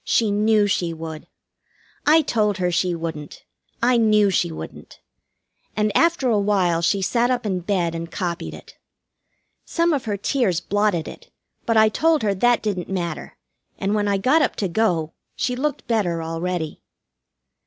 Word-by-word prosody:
She 220 Hz, -3 st, +2 dB
knew 210 Hz, +1 st, +3 dB
she 175 Hz, -4 st, 0 dB
would. 160 Hz, -1 st, -8 dB, 0.8 s
I 315 Hz, +1 st, +6 dB
told 210 Hz, -6 st, 0 dB
her 180 Hz, -2 st, 0 dB
she 175 Hz, 0 st, 0 dB
wouldn't. 160 Hz, -3 st, -7 dB, 0.4 s
I 245 Hz, 0 st, +4 dB
knew 215 Hz, -3 st, +4 dB
she 170 Hz, -2 st, +1 dB
wouldn't. 160 Hz, -, -10 dB, 0.8 s
And 210 Hz, -1 st, 0 dB
after 335 Hz, -5 st, +3 dB
a 220 Hz, -4 st, +3 dB
while 190 Hz, -5 st, +1 dB
she 195 Hz, +3 st, +1 dB
sat 240 Hz, +5 st, +1 dB
up 245 Hz, -2 st, -1 dB
in 190 Hz, -3 st, -1 dB
bed 175 Hz, -2 st, -1 dB
and 165 Hz, 0 st, -5 dB
copied 175 Hz, -3 st, -4 dB
it. -, -, -14 dB, 0.9 s
Some 335 Hz, -1 st, +1 dB
of 275 Hz, -4 st, -2 dB
her 205 Hz, -2 st, -2 dB
tears 205 Hz, -, 0 dB
blotted 205 Hz, -5 st, 0 dB
it, -, -, -11 dB, 0.4 s
but 230 Hz, -1 st, +2 dB
I 220 Hz, 0 st, +6 dB
told 315 Hz, +4 st, +2 dB
her 205 Hz, -2 st, +2 dB
that 240 Hz, +5 st, +2 dB
didn't 195 Hz, -5 st, -3 dB
matter, 175 Hz, -3 st, -4 dB, 0.4 s
and 200 Hz, +1 st, -1 dB
when 210 Hz, -1 st, +1 dB
I 200 Hz, -1 st, +2 dB
got 260 Hz, +11 st, +3 dB
up 295 Hz, -, +1 dB
to 200 Hz, -, -1 dB
go 170 Hz, -5 st, 0 dB, 0.2 s
she 250 Hz, -, -1 dB
looked 290 Hz, +3 st, -3 dB
better 180 Hz, -8 st, 0 dB
already. 165 Hz, 0 st, -3 dB
205 Hz, 165 wpm, -22 LUFS, 175-230 Hz, 0.9 s, I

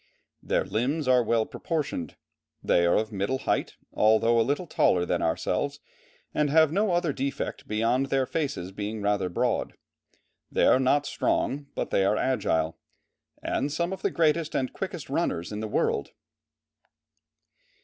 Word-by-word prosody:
Their -, -, 0 dB
limbs 135 Hz, +6 st, -1 dB
are 125 Hz, -1 st, +5 dB
well 115 Hz, -1 st, +1 dB
proportioned, 150 Hz, -, -3 dB, 0.5 s
they 85 Hz, 0 st, +3 dB
are 85 Hz, -, +3 dB
of 110 Hz, +1 st, 0 dB
middle 100 Hz, +6 st, -1 dB
height, -, -, -1 dB, 0.2 s
although 110 Hz, +2 st, +4 dB
a -, -, +5 dB
little 145 Hz, +9 st, 0 dB
taller 90 Hz, -, +2 dB
than -, -, -1 dB
ourselves, 80 Hz, -, -1 dB, 0.5 s
and 150 Hz, -1 st, +1 dB
have 160 Hz, 0 st, +5 dB
no 200 Hz, +2 st, +1 dB
other 175 Hz, -4 st, +1 dB
defect 135 Hz, +1 st, -4 dB
beyond 115 Hz, +5 st, +1 dB
their 135 Hz, -1 st, +1 dB
faces 135 Hz, -, -3 dB
being 105 Hz, +1 st, -5 dB
rather 100 Hz, -2 st, +1 dB
broad; 85 Hz, -, -1 dB, 0.8 s
they -, -, +2 dB
are -, -, +5 dB
not 140 Hz, +2 st, +2 dB
strong, 140 Hz, 0 st, -1 dB
but -, -, -3 dB
they 95 Hz, -, +3 dB
are 105 Hz, +2 st, +2 dB
agile, 80 Hz, -11 st, 0 dB, 0.6 s
and 145 Hz, -, -1 dB
some 170 Hz, +4 st, -1 dB
of 190 Hz, -, -7 dB
the -, -, +1 dB
greatest 160 Hz, -1 st, +1 dB
and 130 Hz, -1 st, -1 dB
quickest -, -, -5 dB
runners 85 Hz, +3 st, -1 dB
in 105 Hz, -, -4 dB
the 110 Hz, -, -3 dB
world." 70 Hz, -8 st, 0 dB
130 Hz, 155 wpm, -27 LUFS, 105-145 Hz, 0.8 s, are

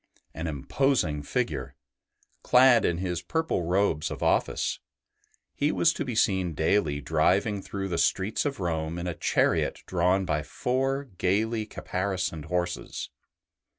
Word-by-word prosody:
An 80 Hz, +2 st, -4 dB
imposing 80 Hz, -, 0 dB
figure, 75 Hz, -, -2 dB, 0.7 s
clad 125 Hz, -2 st, +6 dB
in 85 Hz, -, +1 dB
his 90 Hz, -1 st, -2 dB
purple 160 Hz, -, -1 dB
robes 90 Hz, -3 st, +1 dB
of -, -, -5 dB
office, -, -, +1 dB, 0.7 s
he 145 Hz, +2 st, +1 dB
was 170 Hz, 0 st, +3 dB
to -, -, -3 dB
be 125 Hz, -4 st, -4 dB
seen 95 Hz, -6 st, +1 dB
daily 80 Hz, -2 st, +1 dB
driving 90 Hz, -, +1 dB
through 95 Hz, 0 st, -4 dB
the 85 Hz, -3 st, -2 dB
streets 100 Hz, +3 st, +1 dB
of 140 Hz, -5 st, -3 dB
Rome 80 Hz, -2 st, -2 dB
in 85 Hz, -, -4 dB
a 90 Hz, -, -2 dB
chariot -, -, +1 dB
drawn 90 Hz, +2 st, +1 dB
by 75 Hz, -3 st, 0 dB
four 135 Hz, -, -1 dB, 0.2 s
gaily 110 Hz, +4 st, +1 dB
caparisoned 90 Hz, -6 st, -3 dB
horses. 90 Hz, +1 st, -3 dB
95 Hz, 135 wpm, -27 LUFS, 85-110 Hz, 0.7 s, clad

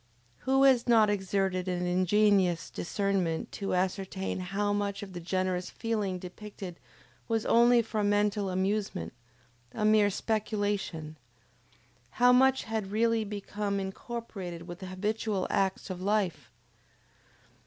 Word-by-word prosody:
Who 270 Hz, 0 st, +5 dB
has 260 Hz, -3 st, +5 dB
not 220 Hz, -3 st, +5 dB
exerted 190 Hz, -2 st, -1 dB
an 180 Hz, -1 st, -1 dB
ingenious 185 Hz, -1 st, +2 dB
discernment 185 Hz, -3 st, -1 dB
to 195 Hz, -2 st, -2 dB
ascertain 190 Hz, +1 st, -2 dB
how 200 Hz, +3 st, -1 dB
much 200 Hz, -1 st, -2 dB
of 195 Hz, -2 st, -9 dB
the 175 Hz, -, -5 dB
generous 185 Hz, +1 st, -1 dB
feeling 210 Hz, -5 st, -2 dB
depicted 185 Hz, 0 st, -9 dB, 0.5 s
was 225 Hz, -2 st, 0 dB
only 235 Hz, 0 st, +5 dB
for 215 Hz, -1 st, -2 dB
mental 205 Hz, -1 st, +1 dB
amusement, 190 Hz, -, -1 dB, 0.6 s
a 210 Hz, -, -1 dB
mere 215 Hz, -1 st, +5 dB
speculation; 205 Hz, -7 st, -2 dB, 1.0 s
how 245 Hz, 0 st, +6 dB
much 265 Hz, +1 st, +4 dB
had 220 Hz, -3 st, -3 dB
really 225 Hz, +1 st, +2 dB
become 205 Hz, -1 st, -3 dB
incorporated 190 Hz, -4 st, -6 dB
with 175 Hz, 0 st, -8 dB
the 190 Hz, -, -7 dB
habitual 205 Hz, +1 st, -2 dB
acts 190 Hz, 0 st, 0 dB
of 180 Hz, -1 st, -6 dB
life? 200 Hz, -2 st, 0 dB
200 Hz, 120 wpm, -29 LUFS, 185-215 Hz, 1.0 s, how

